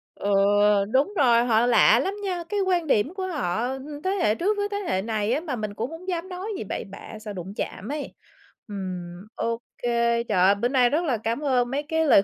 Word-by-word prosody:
Ừ, 205 Hz, -, -3 dB, 0.6 s
đúng 285 Hz, +10 st, +2 dB
rồi, 240 Hz, -4 st, +5 dB
họ 230 Hz, 0 st, +3 dB
lạ 230 Hz, -1 st, +5 dB
lắm 385 Hz, +9 st, -1 dB
nha, 360 Hz, -3 st, -2 dB
cái 415 Hz, -1 st, -1 dB
quan 360 Hz, -4 st, +1 dB
điểm 270 Hz, -, +2 dB
của 380 Hz, -1 st, -3 dB
họ 240 Hz, -, -1 dB
ưm, 285 Hz, +3 st, -6 dB
thế 375 Hz, -, 0 dB
hệ 290 Hz, -, +2 dB
trước 410 Hz, -, 0 dB
với 410 Hz, 0 st, 0 dB
thế 405 Hz, -, -1 dB
hệ 185 Hz, -, +1 dB
này 215 Hz, 0 st, -1 dB
á, 285 Hz, -, +1 dB
mà 290 Hz, -7 st, -3 dB
mình 215 Hz, -2 st, -4 dB
cũng 230 Hz, +8 st, -4 dB
hông 345 Hz, +3 st, -10 dB
dám 360 Hz, 0 st, -3 dB
nói 365 Hz, +2 st, -5 dB
gì -, -, -4 dB
bậy 200 Hz, -, -4 dB
bạ 200 Hz, +2 st, -10 dB
sợ 215 Hz, -1 st, -7 dB
đụng 190 Hz, +1 st, -7 dB
chạm 205 Hz, -, -5 dB
ấy. 295 Hz, -1 st, -5 dB, 0.5 s
Ừm, 185 Hz, -2 st, -6 dB
ô 230 Hz, 0 st, -2 dB, 0.2 s
kê, 235 Hz, -1 st, +1 dB
trời 185 Hz, -, 0 dB
ơi, 200 Hz, +1 st, +5 dB
bữa 235 Hz, +4 st, 0 dB
nay 250 Hz, -2 st, +3 dB
rất 315 Hz, +6 st, +1 dB
là 250 Hz, -6 st, +1 dB
cám 225 Hz, +3 st, -2 dB
ơn 250 Hz, -3 st, +1 dB
mấy 285 Hz, +2 st, -1 dB
cái 320 Hz, +1 st, 0 dB
lời 200 Hz, -, +6 dB
245 Hz, 235 wpm, -25 LUFS, 215-325 Hz, 0.6 s, lời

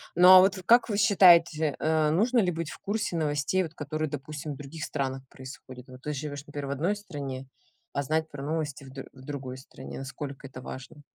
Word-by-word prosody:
Ну, 180 Hz, +1 st, +7 dB
а 185 Hz, 0 st, +11 dB
вот 190 Hz, +2 st, +4 dB
как 235 Hz, +3 st, +5 dB
вы 205 Hz, -, 0 dB
считаете, 170 Hz, -6 st, +5 dB
э, 155 Hz, -1 st, +2 dB
нужно 225 Hz, +10 st, +3 dB
ли 185 Hz, -5 st, +2 dB
быть 165 Hz, -2 st, -4 dB
в -, -, -10 dB
курсе 205 Hz, -3 st, -2 dB
новостей, 155 Hz, +3 st, 0 dB
вот 160 Hz, -2 st, -7 dB
которые, 155 Hz, +1 st, -3 dB
допустим, 150 Hz, +1 st, -6 dB
в -, -, -10 dB
других 150 Hz, +3 st, -8 dB
странах 135 Hz, -3 st, -3 dB
происходят? 130 Hz, -1 st, -11 dB
Вот 130 Hz, 0 st, -13 dB
ты 150 Hz, -, -3 dB
живёшь, 145 Hz, 0 st, -5 dB
например, 145 Hz, -1 st, -5 dB
в -, -, -5 dB
одной 165 Hz, +9 st, 0 dB
стране, 140 Hz, -10 st, -6 dB, 0.5 s
а 140 Hz, -, 0 dB
знать 160 Hz, +3 st, 0 dB
про 140 Hz, -2 st, -8 dB
новости 150 Hz, -2 st, -3 dB
в -, -, -11 dB
дру 135 Hz, 0 st, -8 dB
в 130 Hz, -, -15 dB
другой 130 Hz, -3 st, -6 dB
стране, 130 Hz, 0 st, -10 dB
насколько 135 Hz, 0 st, -7 dB
это 130 Hz, -1 st, -10 dB
важно? 130 Hz, +4 st, -9 dB
150 Hz, 210 wpm, -28 LUFS, 135-170 Hz, 0.5 s, а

